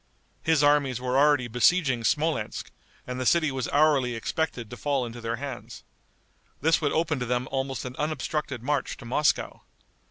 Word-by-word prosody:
His 160 -2 +2
armies 145 -4 +3
were 125 0 -2
already 145 -2 +4
besieging 125 +1 +2
Smolensk, 150 - -1 0.3
and 125 0 -5
the - - 0
city 160 -4 +3
was 130 -2 -3
hourly 140 -5 +3
expected 120 -1 -2
to - - -6
fall 140 0 -1
into 120 0 -8
their 115 0 -2
hands. 120 -4 -7 0.8
This 160 +4 +3
would 145 - +1
open 155 -3 0
to 125 - -2
them 125 +1 -1
almost 135 -2 -2
an 125 0 -6
unobstructed 150 -4 -2
march 145 0 -1
to 120 - -12
Moscow. 145 +5 0
135 Hz, 165 wpm, -26 LUFS, 125-150 Hz, 0.8 s, already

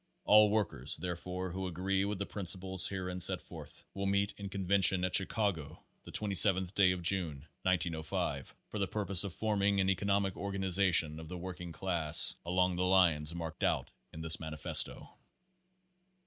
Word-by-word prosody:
All 105 0 +6
workers, 80 - 0
therefore, 90 +1 -6
who 95 +1 -5
agree 95 +3 -2
with 100 0 -4
the 100 - -4
princi 95 -2 -4
ples 95 -1 0
herein 90 -2 -5
set - - +3
forth, - - -13
will 100 0 -4
meet 100 +1 0
in 100 -1 -8
convention 95 -2 +1
at 90 - -4
Chi 95 - +4
cago 85 -9 -3 0.2
the - - -13
27th 95 -2 +3
day 95 -2 +3
of 90 -1 -5
June, 80 -6 0 0.2
1905, 85 -4 -3
for 105 - -7
the 100 - -1
purpose 100 -2 +4
of 100 - -5
forming 100 +2 -1
an 95 0 +2
economic 100 0 -1
organization 95 -5 +1
of 80 - -10
the 90 +2 -7
working 90 -1 -8
class 80 -2 +3
along 90 0 0
the 90 - -1
lines 85 -4 +2
marked 80 -3 -7
out - - -1 0.2
in 80 - -10
this 80 0 +1
manifesto. 80 -3 +2
90 Hz, 165 wpm, -31 LUFS, 85-100 Hz, 0.2 s, All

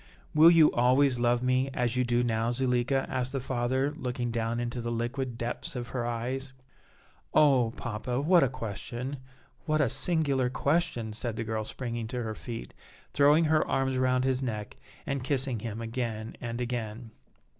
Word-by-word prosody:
"Will 160 +2 +8
you 165 -3 +6
always 125 +1 +3
love 120 0 +2
me 130 +1 +2
as 120 -1 0
you 125 - +2
do 120 0 +1
now, 115 -1 0
Zuleika?" 130 +1 +1
asked 130 0 -2
the 135 - 0
father, 130 +2 -1
looking 125 -3 -3
down 115 0 -1
into 120 0 -3
the 120 0 -3
liquid 120 +1 -3
depths 120 +2 -4
of 125 -1 -4
her 120 -2 -2
eyes. 130 +3 -3 0.8
"Oh! 135 -7 +5
papa, 115 +2 -3
what 170 +5 +5
a 135 - +3
question, 120 +3 -5 0.5
what 155 -1 +1
a 145 - +4
singular 135 -2 +2
question!" 140 -5 0
said 115 +1 -2
the 115 - -3
girl, 110 -1 -3
springing 120 -1 -4
to 125 +1 -3
her 110 -1 -3
feet, 115 +1 -7 0.4
throwing 145 +3 +5
her 155 0 +3
arms 135 0 0
around 130 0 +2
his 130 0 +1
neck, 110 -5 -4 0.3
and 135 -2 -2
kissing 130 -3 -1
him 110 +1 -5
again 115 -1 -4
and 120 0 -4
again. 120 -2 -4
125 Hz, 170 wpm, -29 LUFS, 115-135 Hz, 0.8 s, Will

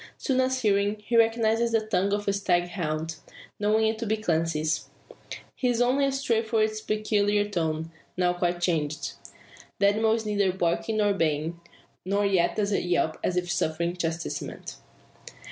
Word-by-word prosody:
Soon 260 -2 +1
as 260 0 0
hearing, 200 0 +2
he 240 - -1
recognises 230 0 +3
the 220 -1 +2
tongue 200 -2 +1
of 205 0 -1
a 200 - +2
stag 175 -3 +1
hound, 160 -3 -3 0.4
knowing 215 +2 +2
it 220 0 0
to 230 - -3
be 220 +1 +1
Clancy's. 165 -5 -1 0.6
He 255 - -1
is 240 -1 +1
only 255 +3 +3
astray 270 -4 +1
about 220 -1 +1
its 215 0 -1
peculiar 210 -1 +1
tone, 160 -4 -2 0.3
now 180 -1 +2
quite 175 0 -1
changed. 155 -4 -1 0.7
The 200 0 +4
animal 220 +2 +2
is 225 -1 -2
neither 200 -3 +1
barking 175 +3 0
nor 205 -1 +3
baying; 160 -1 -1 0.4
nor 200 +2 0
yet 185 -3 +2
does 210 -1 0
it 200 - 0
yelp 165 -3 +1
as 180 - 0
if 175 -1 -1
suffering 170 +1 -1
chastisement. 170 -1 -4
200 Hz, 165 wpm, -26 LUFS, 170-220 Hz, 0.7 s, The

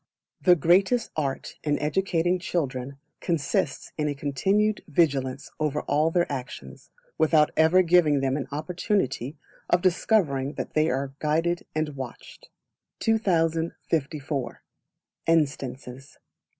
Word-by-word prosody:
The 180 -1 +6
Greatest 190 - +3
Art 140 -3 -3
in 145 -1 +1
educating 175 +2 0
children 140 -6 -3 0.2
consists 145 -4 -1
in 150 - +1
a 145 - -2
continued 195 - 0
vigilance 140 -5 0
over 150 -1 0
all 155 +2 +1
their 175 +1 +2
actions, 130 -3 -7 0.3
without 155 -1 +4
ever 160 +4 +5
giving 165 -4 +4
them 135 0 0
an 140 - -3
opportunity 155 - -2 0.3
of 175 +1 +3
discovering 170 -7 +1
that - - -5
they 155 +1 +2
are 135 +1 -2
guided 165 +3 0
and 155 -1 0
watched. 135 -4 -9 0.5
2054. 160 - -1 0.6
Instances. 135 -4 -1
155 Hz, 110 wpm, -26 LUFS, 140-175 Hz, 0.6 s, The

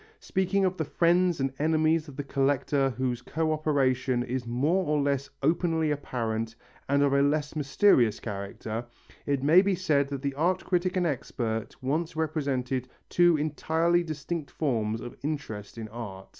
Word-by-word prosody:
Speaking 190 +1 0
of 185 0 0
the 160 - 0
friends 175 +2 +2
and 135 0 -1
enemies 155 +1 +2
of 140 - -10
the 145 - -4
collector 140 0 +1
whose 125 -1 -2
co 155 +5 -1
operation 130 -5 +1
is 125 0 -3
more 145 +11 +1
or 150 -2 +1
less 140 -1 0
openly 160 0 +2
apparent 115 -5 -2 0.3
and 140 +1 +3
of 140 -1 +2
a 140 - +4
less 150 +1 +1
mysterious 140 - +3
character, 105 +2 -5 0.4
it 140 -2 0
may 160 +6 +7
be 200 -1 +1
said 150 -6 +1
that 140 -1 -5
the 140 -1 -1
art 175 +6 0
critic 185 0 0
and 180 - +2
expert 115 -6 -3
once 155 +5 -1
represented 140 -5 -1 0.2
two 175 -2 +4
entirely 160 +3 +1
distinct 155 -1 -4
forms 115 -7 -1
of 120 - -8
interest 115 -9 -5
in 110 -1 -5
art. 105 -4 -8
145 Hz, 160 wpm, -28 LUFS, 125-160 Hz, 0.4 s, may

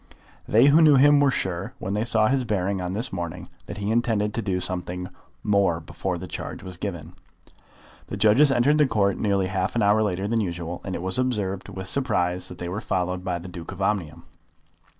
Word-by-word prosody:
They 115 +5 +5
who 145 +3 +6
knew 155 -3 +7
him 145 +2 +6
were 145 -1 +4
sure, 95 -7 -3
when 95 - -4
they 105 +2 0
saw 110 -2 +2
his 130 +1 +1
bearing 100 -4 -1
on 90 0 -3
this 115 +4 0
morning, 85 0 -5 0.2
that - - -7
he 100 +1 -2
intended 110 -3 +1
to 115 - -2
do 95 -3 -1
something 90 0 -2 0.3
more 100 -5 +2
before 80 - -4
the - - -7
charge - - -7
was 95 -1 -8
given. 90 -4 -6 0.9
The 105 - -5
judges 110 +8 +5
entered 135 +4 +3
the 150 - +5
Court 100 -5 +1
nearly 100 -2 +1
half 95 +2 -2
an 115 - +2
hour 105 +2 +4
later 100 -2 -1
than 115 +1 +1
usual, 85 -2 -4
and 95 - -4
it 85 - -5
was 95 +6 -1
observed 105 -7 -2
with 95 0 -7
surprise 90 -7 -1
that 90 - -10
they 85 - -5
were 95 +5 -4
followed 90 -3 -2
by 90 -2 -2
the 85 +2 -9
Duke 85 -2 -8
of - - -10
Omnium. 95 -6 -2
100 Hz, 210 wpm, -24 LUFS, 90-115 Hz, 0.9 s, knew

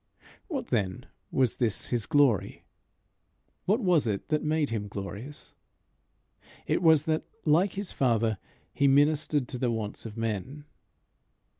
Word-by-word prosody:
What 295 -8 -4
then 100 -6 -1 0.3
was 130 -3 +1
this 115 -5 0
his 115 -6 -1
glory? 140 -9 +2 1.0
What 215 +6 +2
was 175 - +3
it 100 +3 -3
that 150 -1 +1
made 155 -1 +1
him 105 -2 -2
glorious? 100 +8 -7 1.1
It - - 0
was 160 -4 +5
that, 155 0 +1 0.2
like 170 +5 +3
his 200 -1 -4
Father, 115 -5 +1 0.3
he 140 - +3
ministered 145 0 +3
to 125 - -6
the 125 - +1
wants 110 -1 -4
of 110 0 -10
men. 115 +6 -3
135 Hz, 135 wpm, -28 LUFS, 110-155 Hz, 1.1 s, was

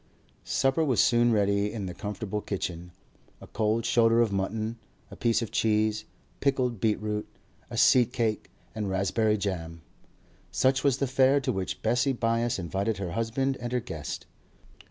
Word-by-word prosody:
Supper 135 +4 +2
was 130 -9 +1
soon 120 +2 +4
ready 100 -1 +2
in 105 -4 -4
the 90 - -5
comfortable 105 +1 -4
kitchen. 90 -3 -4 0.5
A - - -11
cold 110 +1 -1
shoulder 115 -1 +4
of 115 -3 +3
mutton, 110 +4 -2 0.3
a - - -8
piece 115 0 +1
of 115 - -6
cheese, 110 0 +1 0.3
pickled 130 -5 0
beetroot, 105 0 -1 0.4
a - - -6
seed 125 -2 +5
cake, 115 -4 -1 0.2
and 105 -2 -3
raspberry 100 +3 +1
jam; 85 -5 -4 0.7
such 130 0 +2
was 140 -3 +3
the 140 - 0
fare 135 +1 +3
to 130 - 0
which 95 -4 -4
Bessie 125 +2 +2
Byass 115 0 0
invited 95 +4 -2
her 95 -3 -4
husband 115 +6 -1
and 120 0 -4
her 125 - +2
guest. 80 -11 -6
110 Hz, 155 wpm, -27 LUFS, 100-120 Hz, 0.7 s, seed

